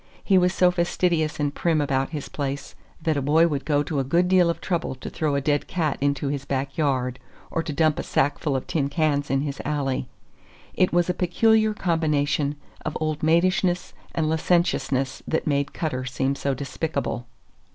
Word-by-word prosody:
He 195 - +3
was 180 0 +3
so 180 -1 +4
fastidious 170 -3 0
and 145 -1 0
prim 165 -1 +1
about 135 -2 0
his 150 -3 -5
place 140 -1 -4 0.3
that 155 -2 +1
a - - 0
boy 155 +5 +4
would 140 -4 -3
go 145 -1 +2
to 145 -1 -2
a - - +1
good 170 +7 +2
deal 180 -2 +4
of 170 - -1
trouble 170 -7 -2
to 130 - -8
throw 150 -3 0
a 140 - +1
dead 145 +1 0
cat 160 -6 -1
into 140 0 0
his 140 -1 -2
back 135 0 -3
yard, 130 -4 0 0.3
or 165 - 0
to 165 - -5
dump 155 +1 +2
a - - 0
sackful 145 +1 0
of 130 - -2
tin 140 -4 -1
cans 145 -1 0
in 135 0 +1
his 145 -1 -4
alley. 140 -4 -1 0.7
It 185 - +2
was 175 0 +2
a 180 - +1
peculiar 220 +5 +3
combination 150 -5 +1 0.3
of 155 - -3
old 155 -1 -2
maidishness 175 +2 +2 0.2
and 160 -2 +1
licentiousness 155 -5 +1
that 160 - 0
made 140 -1 0
Cutter 130 -6 -3
seem 130 +2 -1
so 140 -1 -1
despicable. 140 -2 -3
150 Hz, 190 wpm, -24 LUFS, 140-170 Hz, 0.7 s, so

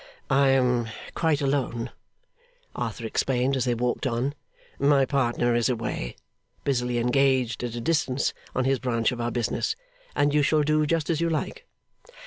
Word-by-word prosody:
'I 135 0 +5
am 125 -3 +2 0.2
quite 160 -3 +1
alone,' 135 -4 -1 0.8
Arthur - - -4
explained 130 +1 +1
as 130 - 0
they 120 -1 +1
walked 125 +4 -1
on. 125 +3 -1 0.5
'My 140 -1 +4
partner 120 -3 +1
is 120 +1 +2
away, 110 - -3 0.5
busily 125 -3 0
engaged 125 -1 +2
at 120 -1 -3
a 120 - -4
distance 140 -2 +1 0.2
on 130 - +1
his 135 -1 +2
branch 115 -3 +1
of 120 -1 -4
our 120 - 0
business, 120 - -1 0.4
and 145 0 +2
you 150 - +4
shall 150 +1 +3
do 155 0 +2
just 165 0 +1
as 160 -1 0
you 170 - +2
like. 185 - -3
130 Hz, 160 wpm, -26 LUFS, 120-145 Hz, 0.8 s, I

